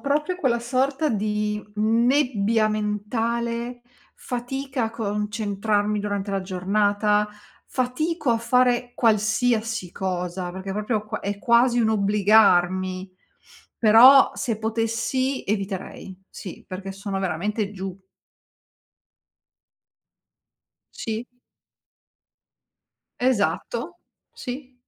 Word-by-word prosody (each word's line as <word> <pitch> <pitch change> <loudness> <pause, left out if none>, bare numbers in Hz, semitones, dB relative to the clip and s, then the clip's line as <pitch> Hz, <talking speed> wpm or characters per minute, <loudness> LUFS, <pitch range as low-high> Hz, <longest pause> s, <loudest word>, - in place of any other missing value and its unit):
proprio 300 +5 0
quella 260 -9 +1
sorta 265 +5 0
di 210 -1 -1
nebbia 230 -1 +2
mentale, 230 +3 -2 0.3
fatica 255 +1 -3
a 220 - -3
concentrarmi 210 -1 -1
durante 200 -1 -3
la 195 - 0
giornata, 205 +3 +1 0.4
fatico 290 +3 -1
a 230 - +2
fare 245 +1 +2
qualsiasi 220 -2 +1
cosa, 180 -1 -3
perché 190 +2 -6
proprio 210 +1 -2
qua 215 0 -4
è 200 0 -3
quasi 240 +2 +3
un 220 -2 +3
obbligarmi. 195 -3 +3 0.7
Però 240 +5 +8
se 230 -5 -2
potessi, 230 +4 -1
eviterei, 195 -2 -4
sì, 185 - -10
perché 190 +1 -6
sono 195 0 -4
veramente 200 +4 -2
giù. 190 -2 -6 3.0
Sì. 225 +1 -4 2.0
Esatto. 255 - -1 0.3
Sì. 255 0 -7
215 Hz, 85 wpm, -24 LUFS, 200-245 Hz, 3.0 s, Però